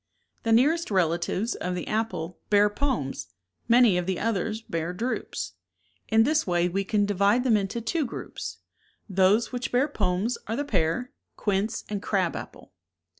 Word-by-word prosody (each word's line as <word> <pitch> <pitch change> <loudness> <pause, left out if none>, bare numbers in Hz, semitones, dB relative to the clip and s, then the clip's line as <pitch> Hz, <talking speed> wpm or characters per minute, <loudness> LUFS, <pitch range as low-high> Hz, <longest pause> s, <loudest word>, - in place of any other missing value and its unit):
The 225 - -1
nearest 300 +9 +4
relatives 185 +4 +1
of 180 0 -3
the 180 - -4
apple 215 -6 -2
bear 205 0 +5
pomes, 205 - -2 0.4
many 235 -6 +5
of 180 - -4
the 190 -2 -1
others 220 0 -1
bear 165 -3 -3
drupes. 240 +7 -3 0.6
In 225 0 +5
this 305 +2 +2
way 175 -1 +2
we 195 +3 -1
can 205 +1 +1
divide 205 +4 +3
them 245 -4 +4
into 205 +3 -1
two 280 +5 -1
groups. - - -6 0.5
Those 195 +3 +3
which 250 0 -3
bear 255 +4 +3
pomes 205 -2 -1
are 225 - -1
the 285 - -2
pear, 185 - 0 0.3
quince, 205 +2 -1
and 205 -2 -3
crab 190 -5 0
apple. - - -9
210 Hz, 160 wpm, -26 LUFS, 185-235 Hz, 0.6 s, bear